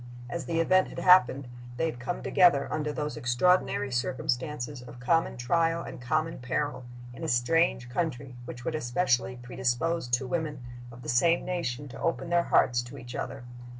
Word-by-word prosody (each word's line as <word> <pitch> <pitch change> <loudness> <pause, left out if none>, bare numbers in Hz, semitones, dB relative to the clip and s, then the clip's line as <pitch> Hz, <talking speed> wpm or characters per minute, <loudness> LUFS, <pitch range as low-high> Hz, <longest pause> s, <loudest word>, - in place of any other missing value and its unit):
As 170 - -4
the 165 -1 -1
event 185 +3 +4
had - - -10
happened, 140 -7 +5 0.3
they 165 - +1
had 155 -7 -3
come 130 +8 -4
together, 170 -6 +4
under 150 -1 -1
those 150 0 -3
extraordinary 130 +2 +2
circumstances 130 +2 -2
of 120 0 -11
common 165 +3 +1
trial 165 +7 +1
and - - -8
common 155 +6 -1
peril, 130 +1 -2 0.3
in - - -9
a - - -2
strange 125 +1 +2
country, 130 -2 -3
which 120 0 -8
would 165 - -1
especially 125 -3 0
predispose 125 +5 -1
two 120 +2 0
women 150 -3 -3 0.3
of 120 +1 -12
the - - -9
same 165 +8 +3
nation 145 -7 -3
to - - -10
open 170 +1 -1
their 175 0 +4
hearts 120 -1 +3
to 120 +3 -10
each 120 -1 -9
other. 135 0 -5
135 Hz, 175 wpm, -28 LUFS, 125-165 Hz, 0.3 s, happened